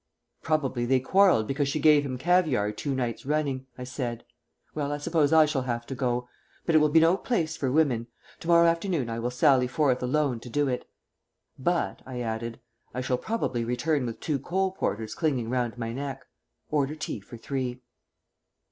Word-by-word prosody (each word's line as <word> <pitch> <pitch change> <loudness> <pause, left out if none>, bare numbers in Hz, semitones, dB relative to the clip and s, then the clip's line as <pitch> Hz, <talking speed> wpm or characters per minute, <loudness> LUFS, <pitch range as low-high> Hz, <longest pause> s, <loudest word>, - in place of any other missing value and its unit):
"Probably 135 -6 0
they 130 +1 +4
quarrelled 185 - +4
because 140 +4 -1
she 145 +2 -1
gave 150 -1 +5
him 130 -3 -4
caviare 155 - +2
two 135 +6 -3
nights 120 -3 -2
running," 140 -2 -1
I 125 - -6
said. 125 -2 -4 0.5
"Well, 145 -2 -2
I 145 - -1
suppose 150 -1 +1
I 160 -1 +7
shall 150 -3 -1
have 120 -2 -3
to 135 - -5
go. 125 -1 -1 0.4
But 165 - +1
it 155 - +7
will 150 0 +4
be 160 +2 +6
no 165 +3 +5
place 165 -8 -1
for 130 -4 -1
women. 130 -6 +2 0.3
To - - -9
morrow 170 0 +6
afternoon 165 - +1
I 115 - -3
will 120 +1 -1
sally 125 0 +4
forth 130 -1 +1
alone 130 -1 +1
to 120 - -10
do 145 +3 +1
it. 125 -1 -3 0.7
But," 175 +6 0
I 130 -1 -5
added, 115 0 -4 0.4
"I 125 - -1
shall 125 -1 0
probably 175 - -1
return 125 +3 0
with 115 - -6
two 150 -4 -1
coal 190 +7 0
porters 110 - -3
clinging 130 -8 -1
round 125 -2 -1
my 115 -1 -3
neck. 135 0 -5 0.5
Order 145 0 +1
tea 155 -7 -4
for 110 +4 -11
three." 125 0 -4
135 Hz, 190 wpm, -27 LUFS, 125-155 Hz, 0.7 s, I